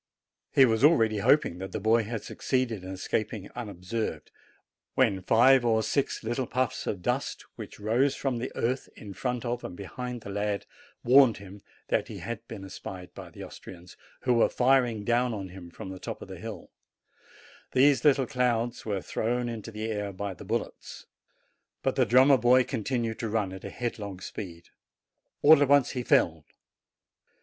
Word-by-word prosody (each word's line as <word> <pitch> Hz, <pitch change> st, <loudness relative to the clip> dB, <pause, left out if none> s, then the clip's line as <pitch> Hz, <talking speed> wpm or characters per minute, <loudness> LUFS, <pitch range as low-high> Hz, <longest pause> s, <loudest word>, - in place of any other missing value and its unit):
He 135 Hz, -, +7 dB
was 115 Hz, -1 st, +1 dB
already 115 Hz, -9 st, +5 dB
hoping 100 Hz, -, +3 dB
that 95 Hz, 0 st, -6 dB
the -, -, -2 dB
boy 110 Hz, +3 st, +3 dB
had 110 Hz, 0 st, -4 dB
succeeded 125 Hz, -7 st, -2 dB
in 95 Hz, -, -7 dB
escaping 100 Hz, +2 st, -3 dB
unobserved, 100 Hz, -6 st, -4 dB, 0.6 s
when 110 Hz, -8 st, +2 dB
five 125 Hz, +6 st, +5 dB
or 110 Hz, -2 st, +2 dB
six 135 Hz, +4 st, -1 dB
little 120 Hz, +3 st, -2 dB
puffs 130 Hz, -1 st, -1 dB
of 90 Hz, -4 st, -3 dB
dust, -, -, -2 dB
which -, -, -9 dB
rose 120 Hz, +7 st, +2 dB
from 130 Hz, -4 st, -2 dB
the 125 Hz, -, -4 dB
earth 130 Hz, +3 st, -1 dB
in 100 Hz, -2 st, -9 dB
front 125 Hz, +2 st, -3 dB
of 120 Hz, 0 st, -2 dB
and 90 Hz, -, -7 dB
behind 125 Hz, +5 st, -6 dB
the 100 Hz, -, -8 dB
lad, 100 Hz, 0 st, -2 dB, 0.4 s
warned 130 Hz, -1 st, +6 dB
him 100 Hz, 0 st, -11 dB, 0.3 s
that -, -, +1 dB
he -, -, -8 dB
had 115 Hz, -2 st, -5 dB
been 100 Hz, -4 st, -8 dB
espied 95 Hz, -1 st, -9 dB
by -, -, -9 dB
the -, -, -10 dB
Austrians, 90 Hz, -1 st, -11 dB, 0.3 s
who 125 Hz, -, +2 dB
were 115 Hz, -, +4 dB
firing 125 Hz, -4 st, +2 dB
down 120 Hz, +1 st, +2 dB
upon 100 Hz, -3 st, -5 dB
him 90 Hz, -1 st, -10 dB
from 95 Hz, -, -9 dB
the 95 Hz, -1 st, -7 dB
top -, -, -6 dB
of -, -, -11 dB
the -, -, -9 dB
hill: -, -, -8 dB, 1.0 s
these 135 Hz, -1 st, +4 dB
little 140 Hz, -3 st, +4 dB
clouds 120 Hz, -1 st, 0 dB
were 100 Hz, -4 st, -3 dB
thrown 120 Hz, +2 st, -1 dB
into 115 Hz, -2 st, -6 dB
the 110 Hz, 0 st, -5 dB
air 105 Hz, -2 st, -3 dB
by 100 Hz, +1 st, -4 dB
the -, -, -11 dB
bullets. -, -, -5 dB, 0.8 s
But 135 Hz, -, +1 dB
the 130 Hz, -3 st, +3 dB
drummer 130 Hz, +4 st, +6 dB, 0.2 s
continued 120 Hz, -2 st, -2 dB
to 115 Hz, -, -2 dB
run 105 Hz, -3 st, -1 dB
at 95 Hz, -, -9 dB
a -, -, -5 dB
headlong 105 Hz, -6 st, -5 dB
speed. 85 Hz, -3 st, -8 dB, 0.7 s
All 150 Hz, 0 st, +8 dB
at 145 Hz, -, +4 dB
once 140 Hz, -3 st, +5 dB
he 125 Hz, -, -3 dB
fell. 80 Hz, -9 st, +2 dB
115 Hz, 175 wpm, -28 LUFS, 100-125 Hz, 1.0 s, All